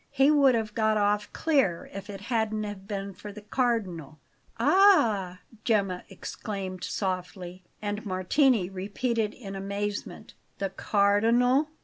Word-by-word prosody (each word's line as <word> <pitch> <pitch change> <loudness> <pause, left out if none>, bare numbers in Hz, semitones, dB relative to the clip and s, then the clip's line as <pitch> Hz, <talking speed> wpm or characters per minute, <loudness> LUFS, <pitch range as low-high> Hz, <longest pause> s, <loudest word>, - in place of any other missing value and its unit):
He 275 +1 +4
would 280 -4 +5
have 220 -2 -2
got 220 -1 +2
off 205 0 +1
clear 270 - +1
if 195 +1 -8
it 195 -1 -7
hadn't 215 -3 -2
been 200 -1 -4
for 205 +2 -9
the 205 +1 -11
Cardinal." 200 - -1 0.4
"Ah!" 220 - +4 0.2
Gemma 195 -5 0
exclaimed 190 -1 -6
softly; 185 -1 -4 0.2
and 205 +1 -3
Martini 195 +3 +2
repeated 210 +4 -2
in 195 -5 -8
amazement: 200 +1 -4 0.2
"The 195 -1 -2
Cardinal?" 230 +7 +3
205 Hz, 120 wpm, -27 LUFS, 195-230 Hz, 0.4 s, would